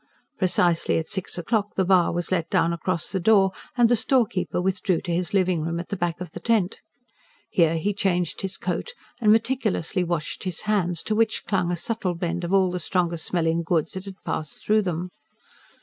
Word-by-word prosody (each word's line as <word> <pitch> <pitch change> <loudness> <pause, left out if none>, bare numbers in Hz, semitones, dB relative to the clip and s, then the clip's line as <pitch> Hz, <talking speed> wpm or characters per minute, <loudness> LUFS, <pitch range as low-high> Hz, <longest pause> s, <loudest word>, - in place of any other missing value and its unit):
Precisely 175 -3 +2
at 160 - -3
six 190 -2 -2
o'clock 210 +4 -1
the 190 - +2
bar 185 -2 +4
was 175 +1 -3
let 170 -3 0
down 170 - +2
across 170 0 -2
the 190 - -1
door, 195 0 +4 0.3
and 240 -1 +6
the 240 - +4
storekeeper 225 -7 +2
withdrew 185 -1 0
to 175 - -3
his 175 +2 -1
living 185 -4 +2
room 165 +2 -2
at 170 - -7
the 200 - -2
back 175 -2 -2
of 180 - -7
the - - -7
tent. 215 -6 0 0.7
Here 165 -2 +3
he 205 +6 0
changed 180 -4 0
his 190 -2 -4
coat 185 - -3 0.3
and 210 -2 +5
meticulously 220 -6 +1
washed 170 -3 -3
his 185 -3 -4
hands, 180 -6 0
to 215 - -1
which 220 0 +1
clung 180 -4 0
a 175 - -1
subtle 185 -1 -2
blend 175 +1 -3
of 170 - -3
all 190 -2 +3
the 180 - -2
strong 175 0 0
smelling 165 0 0
goods 165 -2 0
that 190 +1 -6
had 195 -1 -8
passed 155 -2 -4
through 215 +1 +4
them. 180 -2 -3
180 Hz, 200 wpm, -24 LUFS, 170-200 Hz, 0.7 s, and